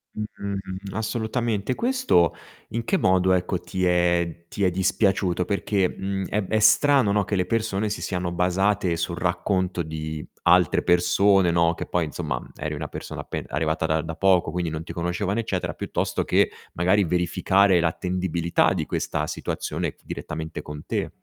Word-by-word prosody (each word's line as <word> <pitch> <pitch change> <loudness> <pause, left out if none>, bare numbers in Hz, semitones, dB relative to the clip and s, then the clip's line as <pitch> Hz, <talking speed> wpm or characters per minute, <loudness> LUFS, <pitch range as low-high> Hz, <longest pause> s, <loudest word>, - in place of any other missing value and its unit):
Mh, 100 -2 -5
assolutamente. 110 0 -1
Questo 245 - +2 0.3
in 115 +1 -3
che 190 - +1
modo, 95 - +3
ecco, 90 0 0
ti 95 -1 -2
è 85 -1 +1
ti 100 - -3
è 90 - +3
dispiaciuto? 95 -1 +1
Perché, 100 -2 +1
mhmm, 95 0 -4
è 105 - 0
b 95 - -8
è 110 - +2
strano, 135 +1 +5
no, 105 0 +2
che 100 - -1
le 90 -1 +1
persone 110 -2 -1
si 105 - -4
siano 90 -2 -2
basate 90 +1 +1
sul 85 +1 -2
racconto 90 0 0
di 80 -1 -5 0.2
altre - - +4
persone, 90 +1 +4
no, 85 0 +3
che - - -5
poi 90 -2 0
insomma, 65 -4 -3
mhmm, - - -13
eri - - -4
una - - -4
persona - - -7
appen - - -5
arrivata 80 +2 0
da 80 0 +1
da 80 0 -6
poco, 95 -4 +3
quindi 85 -2 -2
non 80 0 -4
ti - - -8
conoscevano 90 +5 -1
eccetera, 100 -5 -2
piuttosto - - -2
che - - +3 0.2
magari 95 +4 +3
verificare 90 +2 +3
l'attendibilità 85 0 0
di - - -2
questa - - -2
situazione - - -3
f - - -30
direttamente 80 0 -5
con 75 0 -8
te. - - -2
90 Hz, 170 wpm, -24 LUFS, 85-100 Hz, 0.3 s, strano